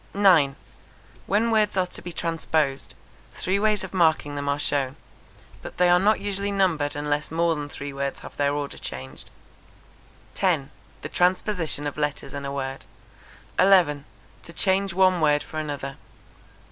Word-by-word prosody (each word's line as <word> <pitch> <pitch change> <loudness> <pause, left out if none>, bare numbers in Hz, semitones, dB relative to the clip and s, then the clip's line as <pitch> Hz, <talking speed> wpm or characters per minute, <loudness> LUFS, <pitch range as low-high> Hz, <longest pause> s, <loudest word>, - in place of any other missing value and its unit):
9. 170 -9 +5 0.7
When 220 +4 +2
words 215 -3 +2
are 185 - +3
to 180 - -6
be 175 - -7
transposed, 160 -4 -1 0.4
three 190 +2 0
ways 210 -2 +2
of 190 - -7
marking 160 -5 +2
them 145 0 -2
are 140 - +1
shown; 140 -2 -1 0.7
but - - -9
they 180 0 +4
are 175 0 +6
not 210 +3 +3
usually 200 0 -2
numbered 170 -8 +1
unless 145 0 -1
more 165 +1 +1
than 145 -2 -5
three 140 0 -7
words 140 0 -3
have - - -11
their 140 -1 +1
order 145 -1 -4
changed. 65 +2 -7 1.0
10. - - 0 0.3
The - - -5
transposition 180 -4 0
of 145 +1 -4
letters 145 -2 -2
in 140 0 -5
a 140 - -3
word. 135 -1 -4 0.7
11. 175 -7 +4 0.4
To 170 - -12
change 195 +2 +1
one 185 -1 +3
word 150 -1 +3
for 155 - -6
another. 145 -3 -5
160 Hz, 160 wpm, -25 LUFS, 145-190 Hz, 1.0 s, are